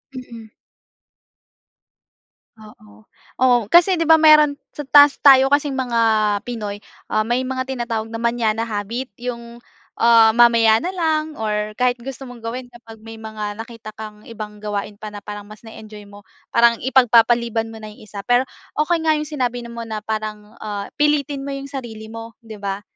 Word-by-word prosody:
Mm. 235 -3 -10 2.1
Oo. 105 - -17 0.3
Oo, 255 -1 +4
kasi 350 +2 +5
'di 330 - -1
ba 320 - +8
meron 305 -2 +5 0.2
sa - - -6
'tas 290 0 +5
tayo 270 -2 +7
kasing 285 -2 +1
mga 245 -3 -1 0.4
Pinoy, 210 -4 -6 0.3
uh, 215 - +3
may 240 +4 -1
mga 260 0 -4
tinatawag 235 -4 -3
na 225 - -5
mañana 230 -1 0
habit. 225 +2 -5
Yong, 235 -1 -7 0.4
uh, 230 -1 +6
mamaya 230 -2 +5
na 360 - -3
lang, 315 -4 -1
or 210 -1 -3
kahit 250 -1 0
gusto 270 +1 -8
mong 245 -2 -11
gawin 240 +3 -5
kapag 230 -2 -14
may 225 0 -10
mga 215 -1 -5
nakita 225 -2 -10
kang 215 -1 -10
ibang 215 -2 -8
gawain 205 0 -5
pa 215 0 -9
na 205 - -8
parang 205 -1 -8
mas 210 0 -14
na-enjoy 215 -2 -12
mo, 205 0 -15 0.2
parang 235 0 +3
ipagpapaliban 235 -2 +3
mo 225 - -10
na 215 -1 -10
yung - - -18
isa. 200 -1 -9
Pero, 245 +2 +3 0.3
okey 320 +2 0
nga 315 - +4
yung 305 0 -3
sinabi 245 -5 -2
na 235 - -9
mo 230 0 -6
na 220 -1 -5
parang, 215 0 -6
ah, 205 -2 -6
pilitin 290 -2 0
mo 280 - -4
yung 275 0 -7
sarili 225 -6 -8
mo, 230 0 -9
'di 220 -2 -11
ba, 200 0 -4
230 Hz, 175 wpm, -20 LUFS, 215-260 Hz, 2.1 s, ba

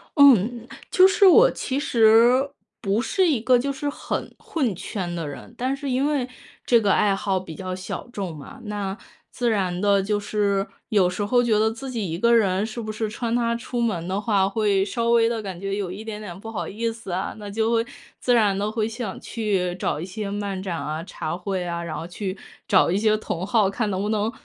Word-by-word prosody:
嗯。 245 - +5 0.2
就 370 0 +7
是 390 +1 +4
我 455 +7 +7
其 265 +1 -2
实 240 +2 +5 0.3
不 205 +1 +1
是 375 +8 +2
一 290 -7 +2
个 250 +2 +4
就 275 +3 -1
是 275 +1 -3
很 285 - -4
混 260 - -1
圈 185 -1 -4
的 165 -3 -3
人， 145 - -9
但 260 +2 -1
是 275 0 -5
因 260 +3 +1
为 285 -4 0 0.4
这 235 - +5
个 205 -2 +2
爱 200 -2 +3
好 195 -1 0
比 170 -4 -9
较 185 +1 -5
小 185 +5 -6
众 190 -8 -4
嘛， 265 - -11
那 205 -2 -3 0.3
自 240 -1 0
然 185 -5 0
地 200 -1 +4
就 205 +1 0
是， 200 -1 0 0.2
有 200 -6 +3
时 185 +3 -3
候 245 +4 +3
觉 225 -3 +2
得 220 +1 +3
自 245 +4 -7
己 225 -7 -3
一 165 - -2
个 235 +5 +3
人， 200 -3 +2
是 225 +2 -5
不 215 -1 -4
是 215 +1 -2
穿 230 +2 -3
它 235 -1 +1
出 240 +1 -4
门 200 -8 -1
的 190 +2 -1
话， 205 -2 +2
会 200 -2 +2
稍 230 +3 -1
微 230 -1 +4
地 230 -1 -2
感 190 -4 -6
觉 195 +1 -3
有 200 -3 -3
一 200 +4 -7
点 220 -1 -6
点 190 -5 -8
不 225 +3 -8
好 175 -7 -4
意 230 +3 -2
思 225 -4 -9
啊。 185 +2 -2
那 205 -1 -7
就 220 +2 0
会 230 0 +2 0.3
自 245 - +2
然 210 -5 +3
地 205 +1 -1
会 220 -1 0
想 225 -3 -5
去 195 -6 -1
找 180 - -2
一 - - -4
些 200 +2 -5
漫 200 -2 -3
展 185 -3 -3
啊、 155 0 -4
茶 170 -2 -5
会 185 0 -3
啊， 170 -1 -3
然 165 -2 -5
后 - - -5
去 185 +2 -5 0.3
找 190 -3 +4
一 185 - +2
些 215 +1 +3
同 180 -4 -4
好， 210 -3 +3
看 215 +2 -1
能 190 -1 -1
不 205 - -1
能 215 0 0
210 Hz, 245 characters per minute, -24 LUFS, 190-235 Hz, 0.4 s, 就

